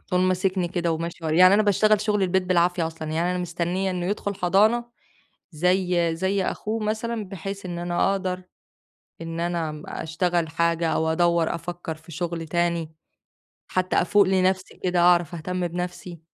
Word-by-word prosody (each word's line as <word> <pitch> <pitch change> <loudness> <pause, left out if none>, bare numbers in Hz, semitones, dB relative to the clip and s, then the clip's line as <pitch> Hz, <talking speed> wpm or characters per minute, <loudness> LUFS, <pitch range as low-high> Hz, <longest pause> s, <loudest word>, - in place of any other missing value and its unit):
على - - -38
طول 180 - +2
ماسكني 185 -1 +1
كده 175 -1 -1
وماشي 165 +1 -5
ور 155 -1 0
يعني 185 +3 +7
أنا 215 - +4
باشتغل 210 +1 +3
شغل 210 -1 0
البيت 190 0 +2
بالعافية 175 -1 +2
أصلًا، 160 -1 -6
يعني 165 +3 0
أنا 180 - -1
مستنية 180 +2 -2
إنه 180 -1 -2
يدخل 205 0 -2
حضانة 205 +6 +3 0.7
زي 180 0 +1
زي 190 +2 0
أخوه 215 +3 -3
مثلًا 220 +1 -2
بحيث 195 +1 -6
إن 175 -1 -5
أنا 175 +2 +1
أقدر 185 -1 -2 0.8
إن 165 0 -5
أنا 165 -3 -2
أشتغل 170 +1 -1
حاجة 170 +1 0
أو 160 - +1
أدوّر، 170 -1 +2
أفكر 170 0 -5
في 160 +2 -15
شغل 170 0 -3
تاني، 170 -1 -1 0.7
حتى 185 0 -1
أفوق 205 +4 +4
لنفسي 190 0 0
كده 180 -1 +2
وأعرف 175 -2 +4
أهتم 175 +2 -3
بنفسي. 175 -1 -6
175 Hz, 160 wpm, -24 LUFS, 170-190 Hz, 0.8 s, يعني